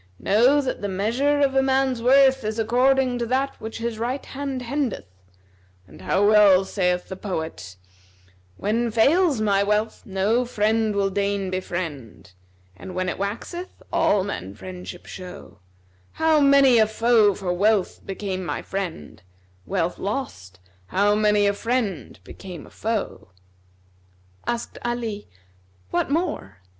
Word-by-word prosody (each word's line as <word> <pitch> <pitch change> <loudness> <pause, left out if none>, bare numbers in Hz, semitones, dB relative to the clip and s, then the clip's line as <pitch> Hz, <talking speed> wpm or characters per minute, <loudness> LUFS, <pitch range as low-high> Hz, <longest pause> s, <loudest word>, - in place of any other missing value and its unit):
Know 245 - +3
that 265 - -4
the 205 - -2
measure 235 +10 0
of 275 -1 +3
a 270 - +4
man's 265 -2 +1
worth 265 +1 +5
is 215 +1 -3
according 250 +2 +2
to 235 - -2
that 265 +3 -1
which 220 0 -6
his 230 -1 -4
right 250 +4 -3
hand 270 -2 -5
hendeth: 265 -2 -2 0.8
and 95 - -15
how 205 +2 +2
well 205 -3 +6
saith 180 -2 -1
the 190 - -6
poet,[FN#258] 160 - -5 0.8
'When 230 +3 0
fails 275 - +3
my 200 -2 +2
wealth 210 +2 0
no 205 +5 +1
friend 220 -2 0
will 195 -1 +1
deign 200 -1 -1
befriend, 155 - -5 0.2
* 90 0 -34
And 185 - -9
when 185 0 -1
it - - -5
waxeth 235 - -5
all 200 -2 +3
men 95 - -5
friendship 180 - -9
show: 180 - -10 0.5
How 320 -1 +3
many 275 -4 +6
a 220 - +5
foe 220 -2 +3
for 185 -3 -2
wealth 205 +1 +1
became 190 -1 -4
my - - -4
friend, 180 - -5 0.2
* 90 0 -35
Wealth 180 -3 -1
lost, 95 - -5 0.3
how 205 +2 +2
many 210 -1 +3
a 200 - +3
friend 205 - -2
became 175 - -10
a - - -16
foe!'" 220 -2 -3 1.2
Asked 235 0 -3
Ali, 230 -4 -3 0.6
"What - - 0
more?" 320 - -2
210 Hz, 145 wpm, -23 LUFS, 185-250 Hz, 1.2 s, well